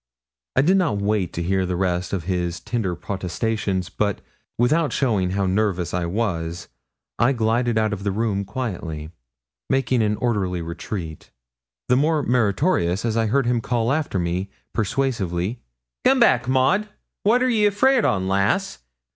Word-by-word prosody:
I 130 - +4
did 185 +6 +4
not 165 - +1
wait 100 -3 0
to 85 - -3
hear 95 +2 +1
the 90 -1 -2
rest 90 -1 -1
of 95 -4 -2
his 90 -1 -2
tender 105 -2 -2
protestations, 95 +1 -2
but, 105 -2 -1 0.4
without 150 +6 +2
showing 105 -9 +1
how 100 +1 0
nervous 95 -2 0
I 90 -1 -1
was, 85 -4 -2 0.5
I 125 +4 +4
glided 115 0 +1
out 110 -1 +1
of 100 -1 -5
the 100 - 0
room 100 -1 -1
quietly, 90 -8 -5 0.6
making 130 -2 +2
an 105 -1 +1
orderly 100 -8 -1
retreat, 85 -1 -6 0.6
the 125 - +4
more 150 +1 +2
meritorious 110 - +1
as 115 -2 0
I 115 -1 +2
heard 135 +4 +2
him 120 -1 +1
call 120 0 0
after 145 -8 -1
me 90 +2 -1 0.2
persuasively 110 -4 -1 0.4
'Come 265 +1 +4
back, 130 - +4
Maud. 135 +12 +2 0.3
What 240 +5 +3
are - - +3
ye 215 -3 +4
afeard 245 +5 +3
on, 95 -2 +1
lass? 95 -8 +1
105 Hz, 155 wpm, -23 LUFS, 90-125 Hz, 0.6 s, I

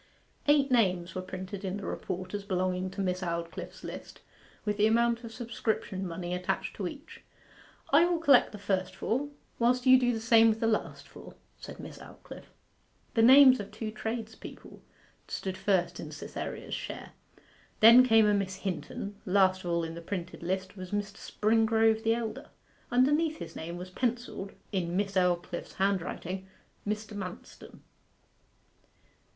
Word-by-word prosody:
Eight 285 -2 +4
names 185 -7 +2
were 185 - -3
printed 185 +2 -7
in 190 +1 -3
the 205 - -7
report 185 +1 -5
as 205 -1 -3
belonging 185 -1 -1
to 195 +2 -5
Miss 185 -1 -1
Aldclyffe's 170 -1 -5
list, - - -8 0.4
with 210 -1 -1
the 210 +1 +4
amount 235 +1 +2
of 230 - -7
subscription 220 -5 -3
money 175 +1 -4
attached 180 0 -2
to 195 - -2
each. 290 - -10 0.7
'I 320 +4 +7
will 350 -1 +1
collect 285 -6 +5
the 210 - -8
first 195 -2 -2
four, 270 +6 -1 0.3
whilst 245 +2 +2
you 260 0 +8
do 245 -1 +2
the 225 - -2
same 225 0 +6
with 220 0 0
the 225 - 0
last 225 -1 -1
four,' - - -13 0.2
said - - -10
Miss - - -9
Aldclyffe. - - -12 0.6
The 225 - +3
names 260 +2 +8
of 205 - -6
two 215 0 -5
tradespeople 220 0 -7 0.5
stood 190 -1 -4
first 185 -2 0
in - - -7
Cytherea's - - -6
share: - - -6 0.7
then 230 +3 +9
came 225 -3 +5
a 210 - +4
Miss 195 -2 -1
Hinton: 190 +2 -5
last 185 0 +3
of 175 - -4
all 170 0 +1
in 165 0 -4
the 170 - -8
printed 175 0 -5
list 190 +3 -3
was 185 -2 -8
Mr. 205 0 -3
Springrove 220 0 +2
the 225 0 +2
elder. 230 -2 -5 0.4
Underneath 295 +6 +2
his - - -8
name 170 +2 -6
was 180 +1 -8
pencilled, 235 -3 -3 0.2
in 180 -3 -1
Miss 200 -1 -1
Aldclyffe's 180 -2 0
handwriting, 190 -1 -2 0.4
'Mr. 210 0 -3
Manston. 185 -3 -9
205 Hz, 160 wpm, -29 LUFS, 185-230 Hz, 0.7 s, then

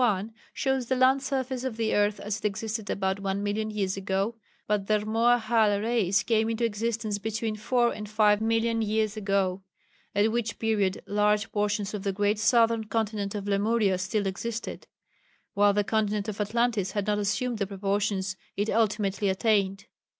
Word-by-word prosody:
1 215 -1 0 0.2
shows 265 -3 -1
the 260 - +1
land 260 +1 +4
surface 260 -2 -2
of 255 -4 -3
the 225 -1 0
earth 205 0 +2
as 210 +1 -3
it - - -8
existed 215 +1 -3
about 190 0 -1
one 195 0 -2
million 215 +1 -1
years 200 -3 -1
ago, 195 +3 -1 0.3
but 205 -2 -1
the 215 - +3
Rmoahal 220 -1 +2
race 215 -4 +2
came 225 -1 +1
into 230 +1 0
existence 220 -1 -2
between 220 +1 -2
four 240 +3 +1
and 210 -1 -7
five 210 -1 +3
million 225 0 +1
years 215 0 0
ago, 195 -2 0 0.5
at 210 +2 +3
which 230 -1 -2
period 205 -4 0
large 210 +1 +1
portions 210 0 -1
of 210 - -3
the 200 0 -1
great 205 +2 +1
southern 230 0 +3
continent 215 -2 -2
of 205 -1 -4
Lemuria 205 -1 +2
still 200 +2 -1
existed, 225 +4 -4 0.7
while 205 0 +4
the 205 +1 +1
continent 210 -1 0
of 210 -1 -3
Atlantis 215 -2 0
had 205 -2 -1
not 210 0 +1
assumed 225 +3 -1
the 200 - 0
proportions 195 -1 -1 0.2
it 205 +2 0
ultimately 210 -3 +1
attained. 195 0 +1
210 Hz, 170 wpm, -27 LUFS, 200-225 Hz, 0.7 s, land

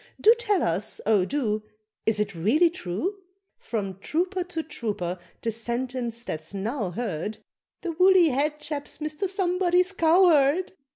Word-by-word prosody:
Do 445 - +7
tell 410 -7 +2
us, 195 +6 -1
oh 210 -4 +4
do, 220 -4 -1 0.5
Is 220 -1 +3
it 205 -1 -1
really 250 - +3
true? 355 - -3 0.4
From 195 -5 -4
trooper 360 - -1
to 330 -3 -4
trooper 205 - -4 0.2
the 230 - 0
sentence 235 +1 -3
that's 160 -3 -5
now 210 +1 -2
heard, 210 -1 -3 0.4
"The 350 - -3
woolly 365 0 +5
head 295 +3 0
chap's 295 -1 -5
Mr. 305 +5 -3
Somebody's 365 -1 +2
cowherd." 335 -2 +4
280 Hz, 135 wpm, -26 LUFS, 215-355 Hz, 0.5 s, Do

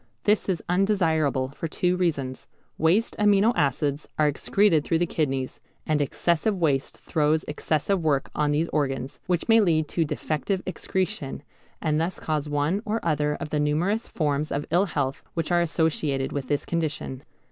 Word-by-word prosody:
This 210 -1 +2
is 180 -4 -1
undesirable 165 -8 +2
for 150 +4 -5
two 180 +3 0
reasons. 145 -8 -2 0.3
Waste 180 +9 +2
amino 210 +2 +4
acids 140 +1 0
are 150 - +4
excreted 160 +2 +2
through 165 - +1
the 175 - +2
kidneys, 135 -6 -2 0.3
and 155 -1 +1
excessive 170 +7 +1
waste 145 -5 0
throws 155 0 +1
excessive 155 +4 0
work 145 -3 +1
on 150 -1 +1
these 150 +3 +1
organs, 135 -3 -2
which 180 -2 0
may 225 -1 +6
lead 160 -5 +2
to 170 - +1
defective 160 +5 -2
excretion, 185 -6 -3 0.4
and 155 0 +1
thus 175 +3 -2
cause 155 -2 -2
one 145 +7 0
or 220 0 -1
other 150 -2 +1
of 150 - -6
the 150 - +1
numerous 170 +10 0
forms 150 -1 -1
of 145 +1 -2
ill 180 +4 +4
health 140 -6 -2
which 165 0 -2
are 175 0 +4
associated 155 -5 0
with 140 -3 -3
this 145 +1 -1
condition. 155 -5 -3
155 Hz, 165 wpm, -25 LUFS, 145-180 Hz, 0.4 s, may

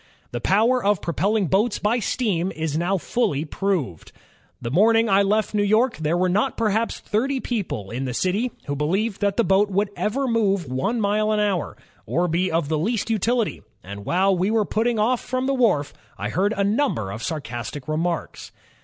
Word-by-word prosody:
"The 120 - -4
power 230 - +3
of 205 -2 +2
propelling 200 +5 0
boats 205 +6 +1
by 220 +4 +1
steam 195 -6 -1
is 160 -2 -2
now 175 +4 +1
fully 180 - -1
proved. 150 - -2 0.5
The 120 -1 -5
morning 225 - +4
I 195 -1 +4
left 210 +2 +1
New 210 - +2
York 220 +5 +2
there 160 +2 0
were 185 +1 +2
not 210 +8 0
perhaps 220 +1 0
thirty 260 +6 -1
people 195 - -4
in 130 +3 -3
the 125 - -3
city, 200 - 0
who 145 - -3
believed 190 +9 -1
that 200 -1 +1
the 235 - +4
boat 200 +1 +3
would 200 +1 0
ever 265 +6 -1
move 200 -6 +1
one 145 - -1
mile 215 +1 +1
an 215 - +1
hour, 200 -5 -1 0.3
or 175 +2 +1
be 175 +3 0
of 165 -2 0
the 155 0 0
least 220 +6 -1
utiUty, 225 +1 0 0.2
and 100 +2 -8
while 190 - +2
we 185 +3 0
were 220 -1 +2
putting 230 +3 0
off 230 +3 +1
from 255 +1 -2
the 275 - +1
wharf, 215 - +2 0.2
I - - -3
heard 200 +4 0
a 200 - +2
number 200 - 0
of 110 +3 -6
sarcastic 125 -2 -5
remarks. 165 +2 -3
200 Hz, 190 wpm, -23 LUFS, 165-225 Hz, 0.5 s, morning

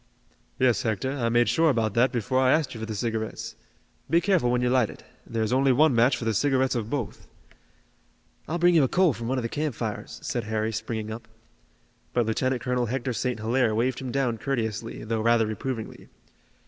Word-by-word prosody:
"Yes, 125 -3 +3
Hector, 110 +3 -1
I 125 -4 -1
made 120 +1 +3
sure 165 0 +3
about 115 -6 +1
that 120 +3 +3
before 125 +2 0
I 130 -1 +4
asked 155 -4 0
you 115 - -8
for 110 - -5
the 110 - -4
cigarettes. 110 0 -3 0.5
Be 165 +3 +4
careful 175 -8 +2
when 125 0 +1
you 125 - +2
light 125 -4 +3
it. - - -12 0.2
There 115 -1 -1
is 110 - -1
only 135 +1 +4
one 145 +3 +4
match 120 +3 +3
for 115 - -5
the 110 - +1
cigarettes 130 +3 +2
of 115 -3 -3
both." 125 -7 -4 1.2
"I'll 165 - -2
bring 175 +1 +4
you 160 -4 +5
a - - +3
coal 180 +1 +3
from 115 0 -6
one 130 +2 0
of 125 - -1
the - - 0
campfires," 120 -7 -4
said 120 -2 -2
Harry, 110 0 -1
springing 110 0 -4
up. 115 +2 -8 0.9
But 120 -2 +2
Lieutenant 125 +2 -1
Colonel 125 -1 0
Hector 125 +1 -2
St. 125 +1 -2
Hilaire 115 0 +1
waved 120 +3 0
him 130 -2 -5
down 125 -4 0
courteously, 115 -5 -3
though 110 0 -2
rather 115 0 +3
reprovingly. 110 +1 -5
120 Hz, 205 wpm, -26 LUFS, 110-130 Hz, 1.2 s, you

